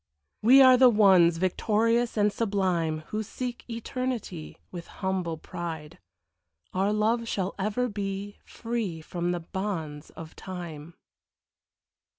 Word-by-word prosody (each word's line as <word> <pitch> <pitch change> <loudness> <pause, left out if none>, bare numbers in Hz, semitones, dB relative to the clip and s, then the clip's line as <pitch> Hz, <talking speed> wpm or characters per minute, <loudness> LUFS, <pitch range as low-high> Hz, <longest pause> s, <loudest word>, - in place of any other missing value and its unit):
We 260 +5 +8
are 255 -1 +8
the 255 0 +7
ones, 190 -6 +5
victorious 225 +6 +1
and 205 0 +3
sublime, 185 -7 0
Who 215 - -2
seek 245 +3 -5
eternity, 230 -7 -4
With 175 -2 -8
humble 185 -4 -3
pride; 160 -2 -7 0.7
our 195 +2 +1
love 225 +2 +1
shall 195 -3 -2
ever 215 +5 0
be 200 -1 -5
Free 225 -8 -4
from 175 +2 -3
the 175 -1 -2
bonds 165 -5 -5
of 160 -1 -11
time. 170 -4 -8
195 Hz, 120 wpm, -27 LUFS, 170-230 Hz, 0.7 s, We